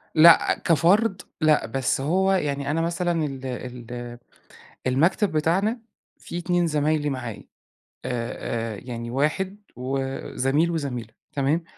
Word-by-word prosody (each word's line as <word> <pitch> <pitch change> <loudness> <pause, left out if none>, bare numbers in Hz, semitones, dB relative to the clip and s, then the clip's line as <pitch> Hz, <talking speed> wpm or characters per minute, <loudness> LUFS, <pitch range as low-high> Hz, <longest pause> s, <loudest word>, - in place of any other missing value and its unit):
لأ 165 +1 +7
كفرد 185 +5 +3 0.2
لأ، 155 -1 +4
بس 130 +3 -1
هو 190 +7 +2
يعني 145 -6 0
أنا 165 +2 +1
مثلًا 170 -1 0
ال 135 -2 -6
ال 120 -1 -6 0.7
المكتب 165 +10 +2
بتاعنا 190 +10 +1 0.4
فيه 170 - -6
2 175 0 +1
زمايلي 150 -1 +1
معايا، 120 -5 -5 0.6
آآ، 115 -2 -3
آآ - - -8
يعني 120 -1 -5
واحد 165 +9 0 0.2
و 130 +2 -2 0.4
زميل، 145 +6 +2
وزميلة، 130 -8 -3 0.2
تمام؟ 145 +4 +1
150 Hz, 120 wpm, -25 LUFS, 125-170 Hz, 0.7 s, لأ